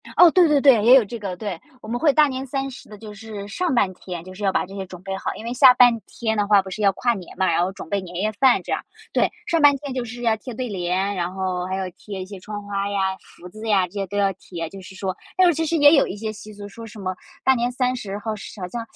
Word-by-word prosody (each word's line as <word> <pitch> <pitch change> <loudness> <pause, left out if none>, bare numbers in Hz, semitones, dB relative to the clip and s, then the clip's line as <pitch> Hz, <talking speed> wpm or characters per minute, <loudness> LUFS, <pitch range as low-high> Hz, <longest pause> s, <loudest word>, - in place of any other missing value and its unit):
哦， 350 -2 +8
对 360 -3 +5
对 295 -2 +3
对， 260 -7 +6
也 245 +4 +8
有 255 - +6
这 230 +3 -7
个， 195 -3 -4
对。 190 -4 -5 0.2
我 215 - -11
们 240 +2 -2
会 295 -1 +4
大 305 0 +5
年 265 0 -4
三 270 +1 -3
十 245 - -12
的 210 - -10
就 210 0 -10
是 205 -1 -8
上 345 - -1
半 190 -5 +2
天， 175 -2 -8
就 185 - -11
是 205 +2 -9
要 195 - +3
把 - - 0
这 195 - -13
些 195 -1 -4
准 180 -1 -11
备 195 0 -4
好， - - -3
因 225 - -9
为 240 - -3
下 255 -1 +8
半 245 -2 +5
天 220 -2 -2
的 205 - +1
话 205 -1 +6
不 190 - -9
是 210 +3 -6
要 200 - +5
跨 240 +2 +1
年 190 -5 -9
吗， 190 - +2
然 165 - +2
后 180 +2 0
准 170 - -10
备 200 - 0
年 180 -1 -10
夜 210 +4 0
饭 260 -2 +5
这 - - -7
样， - - 0 0.3
对。 - - +2 0.2
上 330 -1 +1
半 290 -1 +7
天 275 -1 -6
就 255 -2 -3
是 240 +1 -8
要 230 -2 +2
贴 250 +2 -8
对 250 +2 -4
联， 190 +1 -1
然 175 0 -2
后 185 -1 -2
还 185 - -3
要 190 -1 -3
贴 195 -3 -7
一 - - -5
些 195 0 -10
窗 205 +2 -7
花 200 0 -2
呀， 190 -1 0
福 180 - -14
字 215 +4 -9
呀， 195 -3 +3
这 175 - -23
些 195 -2 -3
都 205 - -5
要 200 -1 +3
贴， 170 -3 -7
就 195 +1 -10
是 190 +1 -12
说。 190 -1 -3 0.2
但 370 - +6
是 345 - +4
其 325 +2 -1
实 335 - 0
也 290 +1 +7
有 275 - +4
一 190 - -5
些 215 +1 -4
习 215 0 -11
俗， 205 0 -9
说 230 +3 -10
什 220 0 -12
么 185 -1 -3 0.3
大 265 - +5
年 240 -1 0
三 255 0 0
十 200 -4 -5
后 220 +1 -3
是 205 0 -10
好 180 - -3
像， 235 +6 -5
210 Hz, 330 characters per minute, -22 LUFS, 190-245 Hz, 0.3 s, 哦